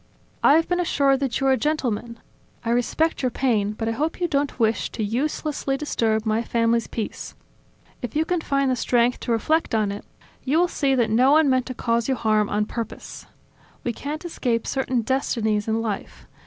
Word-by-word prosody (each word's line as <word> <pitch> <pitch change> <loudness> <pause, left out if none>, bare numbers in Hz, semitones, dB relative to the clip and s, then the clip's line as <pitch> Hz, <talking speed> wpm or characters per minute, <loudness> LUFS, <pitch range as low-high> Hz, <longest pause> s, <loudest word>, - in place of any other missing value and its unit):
I 285 - +7
have 325 +1 +3
been 355 0 0
assured 280 -6 +2
that 270 -4 -1
you 270 - -1
are 270 - +4
a 260 - +3
gentleman. 240 -5 -2 0.5
I 230 - 0
respect 245 +7 +1
your 255 - +1
pain, 220 -5 0
but 225 +1 -4
I - - +1
hope 305 +10 -2
you 350 - +1
don't 285 -3 -1
wish 225 -1 +1
to 220 - -2
uselessly 275 +4 -1
disturb 225 -7 0
my 220 +1 +1
family's 230 0 +1
peace. 220 - -5 0.7
If 245 0 -5
you 315 +1 +2
can 355 0 0
find 275 -3 +1
the - - +2
strength 240 0 +1
to 240 - -3
reflect 270 +5 +1
on 210 -2 +1
it, 205 - -6 0.4
you 280 +4 +1
will 355 +1 +4
see 275 -5 +1
that 235 -4 +1
no 255 +5 +5
one 305 -3 +5
meant 255 -1 +1
to 255 - -5
cause 230 +1 0
you 265 - +2
harm 215 -3 +1
on 210 +1 0
purpose. 230 0 -7 0.6
We 240 - -1
can't 300 +7 -6
escape 240 -9 -1
certain 260 -2 0
destinies 220 -4 0
in 225 +1 0
life. 210 -3 -5
245 Hz, 200 wpm, -23 LUFS, 225-280 Hz, 0.7 s, I